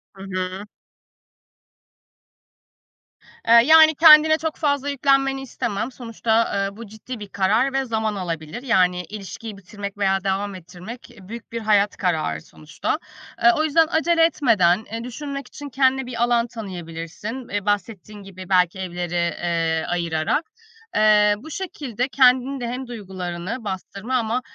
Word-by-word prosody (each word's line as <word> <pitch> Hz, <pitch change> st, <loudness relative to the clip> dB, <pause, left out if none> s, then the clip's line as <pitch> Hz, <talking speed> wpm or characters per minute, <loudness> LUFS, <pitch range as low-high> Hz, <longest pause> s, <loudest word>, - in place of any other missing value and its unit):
Hı 195 Hz, -, -10 dB
hı. 185 Hz, +1 st, -4 dB, 2.8 s
Eee, 230 Hz, -, +6 dB
yani 315 Hz, 0 st, +7 dB
kendine 315 Hz, 0 st, +8 dB
çok 320 Hz, -1 st, -3 dB
fazla 285 Hz, -2 st, 0 dB
yüklenmeni 270 Hz, -1 st, +1 dB
istemem. 240 Hz, -3 st, -4 dB
Sonuçta, 230 Hz, -3 st, -1 dB
eee, 200 Hz, -, -9 dB
bu 230 Hz, -2 st, -9 dB
ciddi 220 Hz, +3 st, -9 dB
bir 205 Hz, -, -8 dB
karar 210 Hz, +8 st, +1 dB
ve 270 Hz, 0 st, 0 dB
zaman 220 Hz, -2 st, -1 dB
alabilir. 170 Hz, +4 st, -5 dB
Yani 180 Hz, -8 st, +2 dB
ilişkiyi 210 Hz, +3 st, -8 dB
bitirmek 200 Hz, +1 st, -8 dB
veya 195 Hz, -1 st, +1 dB
devam 195 Hz, 0 st, -2 dB
ettirmek 185 Hz, +8 st, -11 dB
büyük 230 Hz, +5 st, -10 dB
bir 230 Hz, -, -3 dB
hayat 210 Hz, -1 st, +2 dB
kararı 155 Hz, -, -1 dB
sonuçta. 75 Hz, -1 st, -5 dB, 0.4 s
Eee, 235 Hz, -, +8 dB
o 310 Hz, -, +2 dB
yüzden 315 Hz, +1 st, +3 dB
acele 330 Hz, 0 st, +2 dB
etmeden, 220 Hz, -, +2 dB
eee, 230 Hz, +1 st, -4 dB
düşünmek 275 Hz, +2 st, -6 dB
için 290 Hz, -1 st, -9 dB
kendine 265 Hz, 0 st, +2 dB
bir 240 Hz, -1 st, -2 dB
alan 240 Hz, 0 st, +2 dB
tanıyabilirsin, 190 Hz, +3 st, -7 dB
eee, 205 Hz, -1 st, -3 dB
bahsettiğin 205 Hz, 0 st, -3 dB
gibi 185 Hz, -1 st, -11 dB
belki 180 Hz, 0 st, +2 dB
evleri, 175 Hz, -1 st, -4 dB
eee, 170 Hz, -1 st, -1 dB
ayırarak. 170 Hz, -, -1 dB, 0.5 s
Eee, 210 Hz, -1 st, +5 dB
bu 315 Hz, +9 st, -11 dB
şekilde 275 Hz, -, -4 dB
kendin 260 Hz, +1 st, +3 dB
de 240 Hz, -, -4 dB
hem 250 Hz, +1 st, -5 dB
duygularını 190 Hz, 0 st, -6 dB
bastırma 200 Hz, +4 st, -5 dB
ama 235 Hz, 0 st, 0 dB
220 Hz, 140 wpm, -22 LUFS, 185-260 Hz, 2.8 s, kendine